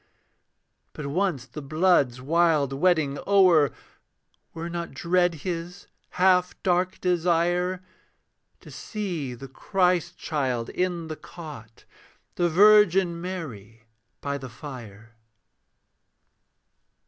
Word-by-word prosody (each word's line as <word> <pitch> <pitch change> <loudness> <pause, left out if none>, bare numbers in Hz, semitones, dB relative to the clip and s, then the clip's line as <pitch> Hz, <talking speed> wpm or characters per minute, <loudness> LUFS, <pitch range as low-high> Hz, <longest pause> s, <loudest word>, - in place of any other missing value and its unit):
But 150 - -7
once 150 -3 -1
the 150 +3 -9
blood's 145 -4 +2
wild 155 -1 +2
wedding 150 -2 +1
o'er, 180 -7 +5 0.8
Were 165 0 -6
not 170 0 -5
dread 175 0 +1
his, 175 +1 -5 0.3
half 180 0 +3
dark 180 0 +1
desire, 180 +1 +1 0.8
To - - -13
see 175 - -5
the 135 +3 -10
Christ 180 +4 0
child 130 -6 -2
in 180 -2 -2
the 155 - -5
cot, 145 -11 -11 0.5
The 175 -1 +1
Virgin 190 -2 +5
Mary 115 - -7 0.4
by 140 0 -3
the 130 -1 -8
fire? 115 -4 -11
170 Hz, 100 wpm, -25 LUFS, 140-180 Hz, 0.8 s, o'er